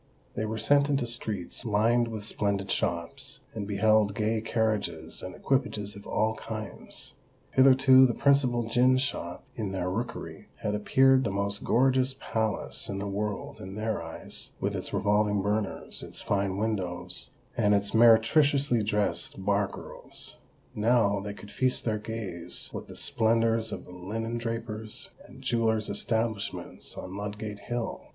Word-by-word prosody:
They 110 - -2
were 110 +1 -3
sent 140 +6 +4
into 140 -3 +1
streets 110 -6 -3
lined 115 +2 +3
with 110 -2 -5
splendid 100 -2 -1
shops, 85 -1 -2
and 105 -3 -4
beheld 105 0 +3
gay 110 +1 0
carriages 105 -8 -1
and 90 0 -7
equipages 105 -7 -1
of 100 - -11
all 110 +1 +1
kinds. 110 -2 -6 0.4
Hitherto 130 0 +7
the 120 - -2
principal 130 -4 +3
gin 125 +3 +4
shop 110 -10 -3
in 105 -4 -3
their 90 -1 -1
rookery 115 +6 -5 0.2
had 105 - 0
appeared 130 +5 +4
the 115 - 0
most 100 +1 -2
gorgeous 130 +2 +3
palace 110 -2 -2
in 100 - -3
the 100 - -3
world 105 +1 -3
in 95 +1 -7
their 110 0 -1
eyes, - - -6
with - - -1
its - - -4
revolving 105 -1 +2
burners, 105 0 -2
its - - -8
fine 100 -1 0
windows, 95 - -3 0.3
and 105 -3 +4
its 100 0 0
meretriciously 120 +3 +5
dressed 100 -3 -1
bar 100 0 +3
girls:—now 105 0 -2
they 100 0 -5
could 100 - -11
feast 130 -1 0
their 110 -2 0
gaze 105 -6 -5
with - - -6
the - - -10
splendours 115 0 +2
of - - -6
the - - -12
linen 115 +6 -4
drapers' 110 -2 -5 0.2
and - - -14
jewellers' 110 -3 +1
establishments 110 0 -2
on 95 +1 -6
Ludgate 105 +1 -5
Hill. 120 +3 -3
110 Hz, 145 wpm, -28 LUFS, 100-115 Hz, 0.4 s, Hitherto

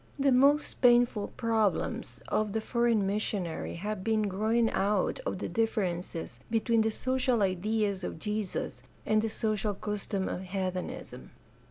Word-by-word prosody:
The 275 -1 +3
most 280 +4 +3
painful 240 -4 +4
problems 225 -4 0
of 215 -2 0
the 220 - +1
foreign 235 -2 +1
missionary 195 -4 -2
have 205 +2 -4
been 220 0 +2
those 205 - -1
growing 225 +4 +2
out 205 - +1
of - - -2
the - - -3
differences 180 - -2
between 225 0 +2
the 220 - +2
social 255 -1 +1
ideals 200 +1 0
of - - -4
Jesus 210 +2 -3 0.2
and 215 0 +3
the 225 - -1
social 215 -1 -1
customs 200 -1 -3
of - - -3
heathenism. 185 - -4
215 Hz, 145 wpm, -30 LUFS, 195-230 Hz, 0.2 s, painful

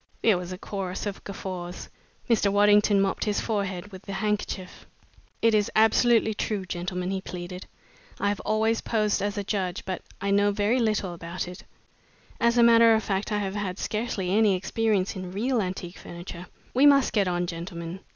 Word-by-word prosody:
There 220 -4 +5
was 180 0 -6
a 185 - -5
chorus 190 -1 -4
of 200 -1 -5
guffaws. 185 -2 -6 0.4
Mr. 215 -4 +3
Waddington 205 0 +5
mopped 195 -1 0
his 210 -1 0
forehead 200 -3 -3
with 190 +1 -11
a - - -3
handkerchief. 205 -3 -3 0.6
"It 230 -1 +5
is 210 -1 +2
absolutely 220 0 +4
true, 205 -2 -2
gentlemen," 180 0 -3
he 190 -1 -2
pleaded. 180 0 -7 0.5
"I 200 - +1
have 205 - -2
always 220 +1 +1
posed 215 -3 0
as 205 0 -2
a 205 - -1
judge 190 -2 -2
but 185 -2 -3 0.2
I 200 0 -1
know 205 +1 +4
very 205 +5 +1
little 215 -6 0
about 170 +1 -5
it. 180 0 -10 0.7
As 235 +1 +3
a 235 - +6
matter 230 -1 +7
of 220 - 0
fact 195 +2 -2
I 210 - +1
have 195 -2 -2
had 200 -3 -3
scarcely 210 -5 -2
any 210 -1 +4
experience 200 +1 0
in 185 -1 -6
real 235 +4 0
antique 185 -1 -5
furniture. 175 +1 -9 0.3
We 270 +3 +6
must 275 -2 +5
get 200 -4 +2
on, 175 0 0
gentlemen. 170 0 -6
200 Hz, 180 wpm, -26 LUFS, 185-215 Hz, 0.7 s, matter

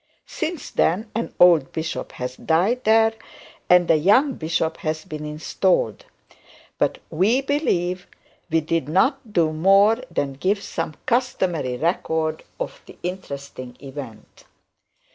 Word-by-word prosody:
Since 320 -2 -4
then, 210 +7 +1
an 230 +2 -3
old 170 -6 +6
bishop 160 0 -4
has 125 0 -5
died 190 - +1
there, 220 0 +5 0.6
and 180 -1 +5
a - - +6
young 230 - +4
bishop 160 -3 -1
has 155 0 -3
been 155 -1 -7
installed; 150 - 0 0.7
but - - +1
we 200 +10 +3
believe 185 - -1 0.4
we 165 0 +2
did 160 -2 -1
not 235 - +1
do 160 -5 +2
more 195 +7 +5
than 140 -1 -2
give 195 +9 -1
some 155 - -4
customary 190 - 0
record 160 0 -1 0.2
of - - -5
the - - -13
interesting 140 -8 -6
event. 135 -5 -10
175 Hz, 125 wpm, -23 LUFS, 155-215 Hz, 0.7 s, old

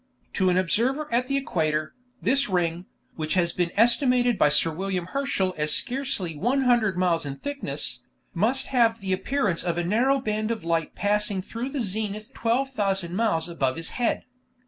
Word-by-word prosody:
To 185 -1 +2
an 180 - +2
observer 245 - +1
at 250 +2 +2
the 275 +1 0
equator, 155 - -1 0.3
this 270 0 +2
ring, 175 -1 -1 0.3
which 155 +1 -2
has 170 -2 +2
been 175 -1 0
estimated 245 +1 +3
by 150 - +4
Sir 150 +3 +3
William 185 +1 -3
Herschel 195 -4 -1
as 150 0 +3
scarcely 245 - -1
100 240 - +2
miles 175 -2 +1
in 140 -2 -5
thickness, 285 - -4 0.3
must 235 +9 +1
have 230 -2 +3
the 190 -2 -1
appearance 205 -3 0
of 170 -1 -1
a 175 - 0
narrow 245 +9 +2
band 215 -3 -2
of 230 -6 -3
light 165 -1 -1
passing 205 -2 0
through 235 +6 -5
the 275 -1 -3
zenith 215 +3 -3
12,000 210 -8 -1
miles 210 -7 +1
above 135 -7 -1
his 165 - -2
head. 245 -2 -1
205 Hz, 170 wpm, -25 LUFS, 170-245 Hz, 0.3 s, by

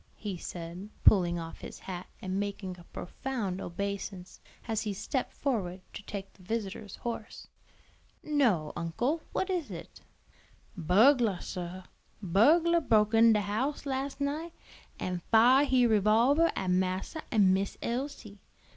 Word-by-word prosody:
he 205 -3 -4
said, 175 +3 -7
pulling 175 -4 +5
off 165 -1 -7
his - - -8
hat 180 -1 -7 0.2
and 190 +1 -2
making 200 -2 -4
a - - -13
profound 200 -2 -4
obeisance, 195 0 -5 0.3
as 220 -2 0
he 210 -2 -2
stepped 255 +6 -2
forward 200 -10 -2
to - - -7
take 200 -1 -7
the - - -21
visitor's 205 0 -4
horse. 230 -2 -6 0.8
"No, 235 - +1
uncle, 240 - -1
what 380 - -1
is 350 -5 -2
it?" - - -9 0.7
"Burglah, 210 - +4
sir, 180 0 -6 0.4
burglah 315 - +4
broke 215 -5 +3
in 225 0 +7
de 210 - +2
house 230 +10 -2
las' 275 +1 -3
night, 305 +4 -2 0.5
an' 180 -1 -3
fire 250 +5 +6
he 255 -3 +4
revolvah 230 - +4
at 185 -1 0
massa 185 - -1
an' 200 -5 +5
Miss 195 +1 -1
Elsie. 235 -5 -4
210 Hz, 140 wpm, -30 LUFS, 185-260 Hz, 0.8 s, in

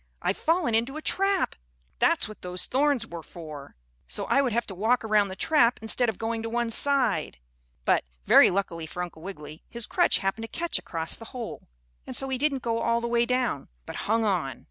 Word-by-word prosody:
"I've 195 - 0
fallen 330 -6 +1
into 235 +6 +1
a - - -5
trap! 390 -1 +1 0.4
That's - - +3
what 215 - -11
those 180 0 -2
thorns 275 -3 +2
were 170 -6 -7
for 155 -4 -10 0.3
so - - -2
I 275 - +3
would 260 -3 0
have 235 +1 0
to 195 - -7
walk 220 +7 +2
toward 210 -2 +2
the 190 - -6
trap 240 +1 +3
instead 225 +2 +1
of 215 - -4
going 225 0 -2
to 225 - -4
one 235 0 -1
side." 245 - +1 0.5
But, - - +3 0.2
very - - +8
luckily 170 -4 -2
for 180 +3 -4
Uncle 170 -2 -9
Wiggily, 155 -5 -9
his 235 -2 -3
crutch - - +3
happened 195 +3 -2
to 225 - -8
catch 340 0 +1
across 165 -1 -1
the 225 - -10
hole, 235 -3 -6 0.4
and - - -4
so 270 - 0
he 260 -1 -1
didn't 275 -3 +1
go 230 -1 0
all 235 0 +2
the 235 - -3
way 235 0 +2
down, 250 - 0 0.2
but - - -7
hung 225 +1 +2
on. 155 - 0
225 Hz, 210 wpm, -27 LUFS, 185-250 Hz, 0.5 s, very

